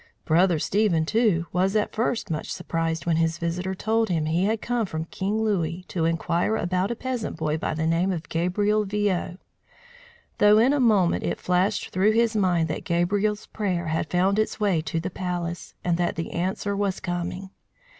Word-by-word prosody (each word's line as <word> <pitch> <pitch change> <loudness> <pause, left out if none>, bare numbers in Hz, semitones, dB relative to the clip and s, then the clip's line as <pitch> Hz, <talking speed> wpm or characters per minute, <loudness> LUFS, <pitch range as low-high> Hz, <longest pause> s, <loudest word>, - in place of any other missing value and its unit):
Brother 170 +1 +3
Stephen, 180 -1 +1
too, 210 -4 +2
was 190 +3 +1
at 210 - +1
first 230 -3 -1
much 155 - -3
surprised 165 -1 -2
when 165 -2 +2
his 165 -1 +1
visitor 180 +2 -2
told 220 +2 0
him 160 -3 0
he 165 +4 +1
had 220 +2 +1
come 235 -2 -1
from 160 -2 -4
King 205 +6 -2
Louis 180 -4 -1
to 165 -3 -1
inquire 170 +5 0
about 180 +2 0
a 235 - -2
peasant 245 -6 -4
boy 155 -1 -1
by - - -2
the 160 +1 -1
name 170 +4 +2
of 170 -4 -4
Gabriel 205 +5 +1
Viaud; 200 -3 -1 1.0
though 210 0 +6
in 245 +6 +4
a 290 - +1
moment 210 -8 +3
it - - -2
flashed 185 +3 0
through 200 +4 +2
his 230 0 +2
mind 180 -5 +2
that 155 - -4
Gabriel's 200 +5 0
prayer 180 -6 -2
had 160 - -1
found 190 +3 +2
its 215 - -1
way 195 -6 +2
to 165 +1 -2
the 170 - -4
palace, 175 -2 -4
and 175 -1 +1
that 175 -1 0
the 165 - -4
answer 190 +3 -2
was 200 -2 -1
coming. 175 +2 -4
185 Hz, 185 wpm, -25 LUFS, 170-210 Hz, 1.0 s, though